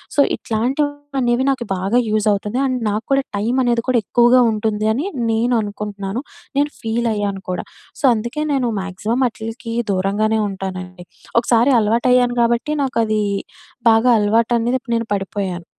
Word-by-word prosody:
So, -, -, 0 dB, 0.2 s
ఇట్లాంటివనేవి 265 Hz, +1 st, -1 dB
నాకు 260 Hz, -3 st, -3 dB
బాగా 195 Hz, +6 st, 0 dB
use 215 Hz, 0 st, +1 dB
అవుతుది. 210 Hz, +4 st, -3 dB
అండ్ 255 Hz, -1 st, -1 dB
నాకు 210 Hz, +2 st, -2 dB
కూడా 275 Hz, 0 st, +2 dB
టైమనేది 240 Hz, +2 st, +1 dB
కూడా 255 Hz, -, +3 dB
ఎక్కువగా 240 Hz, +3 st, +5 dB
ఉంటుందని 220 Hz, +5 st, 0 dB, 0.3 s
నేను 235 Hz, +3 st, +1 dB
అనుకుంటున్నాను. 205 Hz, +1 st, -5 dB, 0.4 s
నేను 290 Hz, +1 st, +2 dB
ఫీల్ 230 Hz, +1 st, -1 dB
అయ్యాను 200 Hz, -2 st, -2 dB
కూడా. 180 Hz, -, -3 dB, 0.3 s
సో, -, -, -12 dB
అందుకే 235 Hz, +6 st, -3 dB
నేను 260 Hz, -3 st, +1 dB
మాక్సిమం 210 Hz, +6 st, -2 dB
అట్లీకి 225 Hz, +1 st, -7 dB, 0.2 s
దూరంగానే 205 Hz, +3 st, +1 dB
ఉంటానండి. 185 Hz, -1 st, -6 dB, 0.4 s
ఒకసారి 235 Hz, +2 st, +3 dB
అలవాటు 230 Hz, +3 st, +2 dB
అయ్యాను. 245 Hz, -1 st, +4 dB
గాబట్టి 235 Hz, +5 st, +1 dB
నాకది 225 Hz, -5 st, 0 dB, 0.7 s
బాగా 225 Hz, +2 st, +4 dB
అలవాటు 220 Hz, +3 st, +2 dB
అనేది 235 Hz, +2 st, 0 dB
ఇప్పుడు 240 Hz, -2 st, -5 dB
నేను 230 Hz, -, -1 dB
పడిపోయాను. 195 Hz, -3 st, -3 dB
225 Hz, 140 wpm, -19 LUFS, 210-245 Hz, 0.7 s, ఎక్కువగా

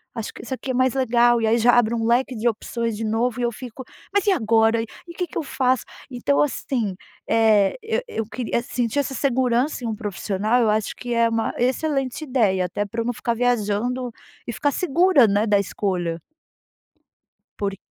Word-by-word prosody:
Acho 225 Hz, -2 st, -5 dB
que -, -, -10 dB
isso 260 Hz, -, -5 dB
aqui 260 Hz, 0 st, -4 dB
é -, -, -2 dB
mais 255 Hz, 0 st, +2 dB
legal". 240 Hz, -2 st, +3 dB
E 225 Hz, -, +1 dB
aí, 225 Hz, +2 st, +3 dB
já 240 Hz, +2 st, +5 dB
abre 235 Hz, -1 st, +3 dB
um 225 Hz, -1 st, -1 dB
leque 245 Hz, +3 st, +2 dB
de 225 Hz, +2 st, -1 dB
opções 230 Hz, 0 st, -3 dB
de 225 Hz, -, -4 dB
novo 225 Hz, +2 st, 0 dB
e -, -, -1 dB
eu 240 Hz, -, +1 dB
fico: 250 Hz, +2 st, -9 dB, 0.3 s
"Mas 405 Hz, -2 st, +2 dB
e -, -, +6 dB
agora? 225 Hz, -, +3 dB
E -, -, -3 dB, 0.3 s
o -, -, -10 dB
que 360 Hz, -, 0 dB
que -, -, -8 dB
eu -, -, +1 dB
faço?". 260 Hz, -3 st, 0 dB, 0.3 s
Então, 255 Hz, +3 st, +1 dB
assim, 240 Hz, -8 st, -2 dB, 0.3 s
eh, 215 Hz, -3 st, +4 dB
eu 450 Hz, +2 st, -1 dB
eu 225 Hz, -, -3 dB
queria 235 Hz, 0 st, -2 dB
sentir 240 Hz, +2 st, -2 dB
essa 275 Hz, -1 st, -1 dB
segurança 255 Hz, +1 st, +1 dB
em -, -, -2 dB
um 220 Hz, -, -2 dB
profissional. 210 Hz, +2 st, -1 dB
Eu 225 Hz, -, +3 dB
acho 210 Hz, 0 st, 0 dB
que 245 Hz, -, -7 dB
é 230 Hz, 0 st, +3 dB
uma 225 Hz, 0 st, -1 dB
excelente 270 Hz, +2 st, -1 dB
ideia 215 Hz, -10 st, +1 dB
até 205 Hz, +3 st, -2 dB
para 225 Hz, +3 st, -4 dB
eu -, -, -3 dB
não 245 Hz, -, -1 dB
ficar 235 Hz, +1 st, -2 dB
viajando 245 Hz, +1 st, 0 dB, 0.4 s
e 235 Hz, -, -3 dB
ficar 290 Hz, +5 st, 0 dB
segura, 340 Hz, -4 st, +4 dB
né, 205 Hz, +2 st, +1 dB
da 205 Hz, -1 st, +4 dB
escolha. 180 Hz, -4 st, -2 dB, 1.4 s
Por 200 Hz, -1 st, -2 dB
235 Hz, 205 wpm, -23 LUFS, 220-255 Hz, 1.4 s, e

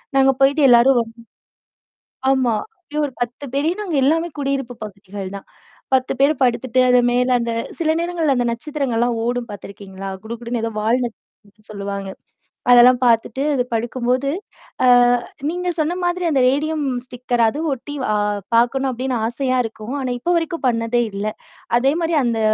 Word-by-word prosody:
நாங்க 270 Hz, 0 st, +5 dB
போயிட்டு 280 Hz, +3 st, +4 dB
எல்லாரும் 245 Hz, +2 st, +6 dB
வ. -, -, +3 dB, 1.3 s
ஆமா. 260 Hz, -4 st, +2 dB, 0.2 s
அப்பயே 300 Hz, -4 st, -7 dB
ஒரு 270 Hz, -, -9 dB
10 245 Hz, +4 st, -4 dB
பேர் 285 Hz, +3 st, 0 dB
ஏன்னா 420 Hz, +4 st, -4 dB
அங்க 330 Hz, -6 st, -1 dB
எல்லாமே 325 Hz, +4 st, +2 dB
குடியிருப்பு 270 Hz, -3 st, -2 dB
பகுதிகள் 200 Hz, -1 st, -8 dB
தான். 195 Hz, -, -11 dB, 0.5 s
10 260 Hz, 0 st, +2 dB
பேர் 280 Hz, +2 st, +5 dB
படுத்துட்டு 250 Hz, 0 st, +2 dB
அது 250 Hz, 0 st, +6 dB
மேல 250 Hz, +1 st, +1 dB
அந்த 235 Hz, 0 st, -2 dB, 0.3 s
சில 320 Hz, -2 st, +2 dB
நேரங்கள்ல 335 Hz, -5 st, 0 dB
அந்த 245 Hz, -1 st, +1 dB
நட்சத்திரங்கள்லாம் 240 Hz, -3 st, -1 dB
ஓடும் 245 Hz, 0 st, -2 dB
பார்த்தருக்கீங்களா? 195 Hz, -1 st, -9 dB, 0.2 s
குடுகுடுன்னு 235 Hz, +1 st, -4 dB
ஏதோ 225 Hz, 0 st, -2 dB
வால் 235 Hz, +4 st, +1 dB
நட்சத்திரம்னு 215 Hz, -2 st, -12 dB
சொல்லுவாங்க. 200 Hz, -1 st, -5 dB, 0.6 s
அதெல்லாம் 245 Hz, +1 st, +7 dB
பார்த்துட்டு 235 Hz, +2 st, +2 dB
அது 255 Hz, -, +2 dB
படுக்கும்போது, 245 Hz, +3 st, -1 dB, 0.6 s
அ -, -, +5 dB, 0.6 s
நீங்க 360 Hz, +1 st, -3 dB
சொன்ன 315 Hz, +3 st, 0 dB
மாதிரி 350 Hz, +1 st, -1 dB
அந்த 275 Hz, -, +2 dB
ரேடியம் 300 Hz, +3 st, 0 dB, 0.2 s
ஸ்டிக்கர் 245 Hz, -1 st, -2 dB
அதுவும் 305 Hz, +7 st, -2 dB
ஒட்டி 290 Hz, +3 st, -9 dB, 0.2 s
அ -, -, +2 dB, 0.4 s
பார்க்கணும் 260 Hz, +3 st, +2 dB
அப்படின்னு 255 Hz, 0 st, -2 dB
ஆசையா 255 Hz, +2 st, 0 dB
இருக்கும். 225 Hz, +3 st, -6 dB
ஆனா 255 Hz, -, -2 dB
இப்போ 345 Hz, +9 st, 0 dB
வரைக்கும் 330 Hz, -2 st, -2 dB
பண்ணதே 230 Hz, 0 st, +1 dB
இல்ல. 200 Hz, +1 st, -3 dB, 0.5 s
அதே 270 Hz, +3 st, +2 dB
மாரி 330 Hz, 0 st, 0 dB
அந்த 230 Hz, -2 st, 0 dB
250 Hz, 155 wpm, -20 LUFS, 230-280 Hz, 1.3 s, அதெல்லாம்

